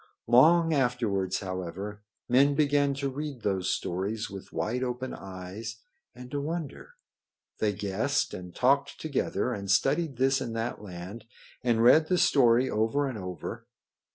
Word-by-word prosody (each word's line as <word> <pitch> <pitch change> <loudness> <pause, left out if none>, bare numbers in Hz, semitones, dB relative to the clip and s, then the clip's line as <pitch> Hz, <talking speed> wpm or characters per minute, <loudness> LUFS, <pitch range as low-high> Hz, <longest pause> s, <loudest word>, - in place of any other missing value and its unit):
Long 165 +7 +5
afterwards, 115 -8 0
however, 95 +2 -5 0.3
men 140 +3 +4
began 145 -1 +2
to 140 0 -2
read 140 -2 -5
those 95 -2 0
stories 100 +5 -2
with 100 -1 -9
wide 125 +3 -2
open 125 +1 -3
eyes 95 +4 -7 0.4
and 125 0 -11
to 145 - -2
wonder. 165 - -5 0.6
They 105 -1 +1
guessed 100 -1 -1
and 90 -1 -8
talked 140 +2 +2
together, 140 -4 -1
and 100 -2 -6
studied 135 - +2
this 135 +1 +2
and 115 -3 -4
that 115 -1 -3
land, 95 +3 -8 0.4
and 115 -2 +2
read 155 +6 +6
the 180 - +2
story 125 -5 +4
over 115 +7 +1
and 125 -5 -5
over. 90 -2 -6
120 Hz, 145 wpm, -28 LUFS, 100-140 Hz, 0.6 s, read